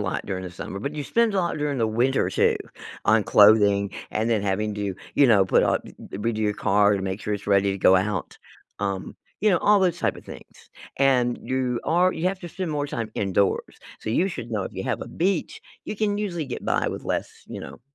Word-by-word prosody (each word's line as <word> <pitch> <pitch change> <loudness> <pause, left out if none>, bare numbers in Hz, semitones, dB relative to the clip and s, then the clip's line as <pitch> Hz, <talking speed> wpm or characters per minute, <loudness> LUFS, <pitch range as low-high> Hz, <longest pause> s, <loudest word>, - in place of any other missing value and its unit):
lot 95 -2 -3
during 95 -2 -3
the 90 - -6
summer, 95 +2 -7
but 140 +7 -4
you 150 -1 -4
spend 230 +2 +1
a - - +2
lot 175 -3 0
during 145 -2 -2
the 115 - +2
winter 120 +5 +1
too - - +2 0.5
on 110 0 +4
clothing 100 -1 +5 0.2
and 110 +2 -1
then 110 -3 +1
having 105 +1 -1
to, 100 -2 -3 0.2
you 140 - +5
know, 105 -5 +5
put 95 - +3
up, - - +1
eh - - -10 0.2
eh - - -4
redo 110 +2 -2
your 105 -1 +1
car 105 +1 +3
to 95 - -4
make 95 +2 -3
sure 105 - -3
it's 100 0 -7
ready 100 -1 +3
to 95 - -3
go 95 - +5
out, 95 -1 -2 0.4
um, 100 -2 -3 0.3
you 215 - +4
know, 180 - +3
all 205 0 +4
those 180 -3 +1
type - - 0
of - - -13
things, - - -13 0.3
and 125 -3 +2
you 130 -2 -1
are 180 +2 +3
you 165 - -5
have 190 0 -4
to 175 - -7
spend 180 -1 -4
more 145 -1 -1
time 115 -5 -4
indoors. 100 0 0 0.2
So 110 - -4
you 185 +11 +2
should 120 -10 -7
know 105 -3 -1
if - - -6
you - - -5
have - - -2
a - - -7
beach, 195 - -1 0.2
you 210 - -5
can 205 -1 0
usually 180 -6 -2
get 130 - -6
by - - +1
with - - -6
less, - - -2 0.2
you - - -7
know - - -10
115 Hz, 240 wpm, -24 LUFS, 100-160 Hz, 0.5 s, clothing